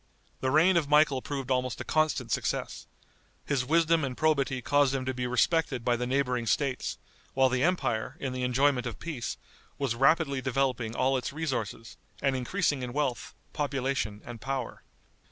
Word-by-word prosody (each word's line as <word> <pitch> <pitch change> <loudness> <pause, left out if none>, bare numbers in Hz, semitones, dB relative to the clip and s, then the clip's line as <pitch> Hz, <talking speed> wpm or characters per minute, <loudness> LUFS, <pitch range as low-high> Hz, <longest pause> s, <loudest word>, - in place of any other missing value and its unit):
The 130 - 0
reign 170 +6 +5
of 150 -4 0
Michael 150 -3 +4
proved 135 -2 -4
almost 125 -1 0
a - - -3
constant 155 0 0
success. - - -2 0.6
His 135 -3 0
wisdom 165 +3 +3
and 130 -2 -3
probity 140 -4 +1
caused 140 +2 +2
him 130 -1 -2
to 130 - -1
be 125 0 -2
respected 130 0 +1
by 120 - +3
the 125 +1 -2
neighboring 125 -3 0
States, 135 +2 0 0.4
while 130 0 +4
the 130 0 0
empire, 130 -7 0
in 135 -2 -3
the 130 - -4
enjoyment 125 0 +2
of 115 - -6
peace, 150 -9 -5 0.4
was 135 -4 0
rapidly 140 +2 +3
developing 125 -3 -1
all 130 +1 +2
its 125 - -3
resources, 130 -7 -4 0.2
and 135 -2 +1
increasing 145 +2 0
in 125 -1 -5
wealth, 140 -4 -2 0.2
population 135 -7 -2
and 120 -2 -8
power. 135 -2 -4
135 Hz, 170 wpm, -29 LUFS, 125-145 Hz, 0.6 s, reign